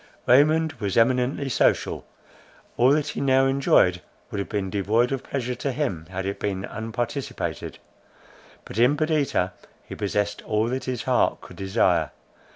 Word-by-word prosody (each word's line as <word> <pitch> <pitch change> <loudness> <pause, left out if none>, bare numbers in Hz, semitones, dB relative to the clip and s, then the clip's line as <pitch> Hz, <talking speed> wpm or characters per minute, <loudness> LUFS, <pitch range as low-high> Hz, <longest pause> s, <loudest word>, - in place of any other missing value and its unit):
Raymond 155 +5 +4
was 100 -3 -2
eminently 125 +4 +2
social. 130 - +1 0.7
All 125 +2 +4
that 150 0 0
he - - -4
now 135 -1 +4
enjoyed 135 -10 +3 0.3
would - - -3
have 100 - -4
been 100 -3 -2
devoid 110 +6 +1
of 135 -2 -2
pleasure 125 -3 -3
to 135 +3 -3
him, 120 - -3
had 95 0 -4
it 100 +1 -3
been 100 -1 -2
unparticipated. 115 +5 -4 0.9
But 110 - -6
in 125 +5 +4
Perdita 150 - 0 0.3
he - - -9
possessed 105 0 -2
all 110 +2 0
that 130 +1 -3
his 125 -2 -3
heart 130 -1 +2
could - - -13
desire. 95 -5 +1
120 Hz, 155 wpm, -24 LUFS, 100-135 Hz, 0.9 s, Raymond